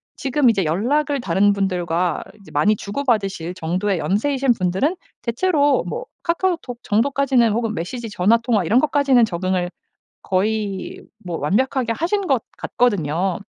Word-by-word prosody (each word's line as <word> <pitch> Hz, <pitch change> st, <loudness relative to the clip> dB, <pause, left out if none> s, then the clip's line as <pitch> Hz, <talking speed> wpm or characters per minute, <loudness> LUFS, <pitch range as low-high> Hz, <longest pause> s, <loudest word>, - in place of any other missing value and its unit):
지금 270 Hz, -1 st, +2 dB
이제 195 Hz, -5 st, +1 dB
연락을 275 Hz, -, 0 dB
다른 200 Hz, +1 st, +3 dB
분들과 180 Hz, -3 st, -1 dB, 0.2 s
이제 -, -, -15 dB
많이 215 Hz, +1 st, +3 dB
주고받으실 200 Hz, -7 st, -2 dB
정도의 185 Hz, +2 st, -1 dB
연세이신 265 Hz, -, +1 dB
분들은 200 Hz, -, 0 dB, 0.2 s
대체로 285 Hz, +3 st, +1 dB
뭐 475 Hz, +1 st, -4 dB, 0.2 s
카카오톡 335 Hz, -8 st, -1 dB
정도까지는 250 Hz, +1 st, +2 dB
혹은 225 Hz, -1 st, -1 dB
메시지 225 Hz, +7 st, -5 dB
전화 205 Hz, +3 st, +3 dB
통화 230 Hz, -5 st, 0 dB
이런 230 Hz, +9 st, +4 dB
것까지는 280 Hz, -4 st, +3 dB
적응을 185 Hz, -2 st, -1 dB, 0.5 s
거의 200 Hz, 0 st, -2 dB, 0.2 s
뭐 170 Hz, -2 st, -3 dB
완벽하게 235 Hz, -, 0 dB
하신 385 Hz, +3 st, -1 dB
것 265 Hz, -6 st, +1 dB
같거든요. 185 Hz, -6 st, 0 dB
220 Hz, 335 characters per minute, -21 LUFS, 185-270 Hz, 0.5 s, 이런